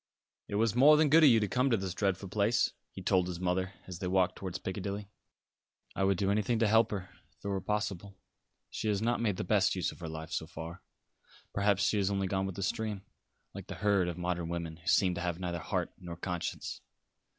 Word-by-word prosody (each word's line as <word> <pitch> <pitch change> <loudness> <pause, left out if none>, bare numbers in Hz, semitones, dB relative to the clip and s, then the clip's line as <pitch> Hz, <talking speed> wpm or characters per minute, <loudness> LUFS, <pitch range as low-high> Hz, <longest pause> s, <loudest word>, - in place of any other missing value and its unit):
"It - - -4
was 110 0 +2
more 145 +5 +7
than 155 -1 +4
good 160 +1 +7
of 150 - +9
you 115 -2 +6
to 105 - 0
come 125 +5 +1
to 115 - +3
this 95 -2 -3
dreadful 95 0 -1
place," 105 +4 +2 0.2
he - - -9
told 90 -1 +3
his 90 -1 -5
mother, 95 +1 -1
as 90 -2 -8
they 90 - -2
walked 90 0 +2
towards 95 -2 -5
Piccadilly. 100 +1 -5 0.8
"I 95 - 0
would 95 -1 +2
do 100 +1 +1
anything 110 +3 +1
to 110 0 +3
help 110 +1 +4
her, 95 -3 -4 0.3
if - - -19
it - - -1
were 100 -1 -1
possible. 100 -2 -3 0.5
She 110 - -3
has 105 -2 +2
not 115 +2 0
made 105 -5 0
the - - -2
best - - +2
use - - -1
of - - -14
her 85 -2 -5
life, 80 +1 -7
so 80 - -2
far. 80 +3 -8 0.7
Perhaps 100 -1 +2
she 105 - +2
has 100 -1 +2
only 100 -1 0
gone 95 0 0
with 95 - -5
the 100 - -3
stream, 105 0 -2 0.5
like - - -8
the - - -6
herd 100 -4 +2
of 85 -1 -3
modern 90 -1 -2
women, 85 -2 -4
who 85 +1 -18
seem 90 0 +4
to 85 - -4
have 85 -1 -1
neither 90 -2 -3
heart - - -2
nor 85 -2 -7
conscience. 90 0 -4
95 Hz, 230 wpm, -31 LUFS, 90-105 Hz, 0.8 s, of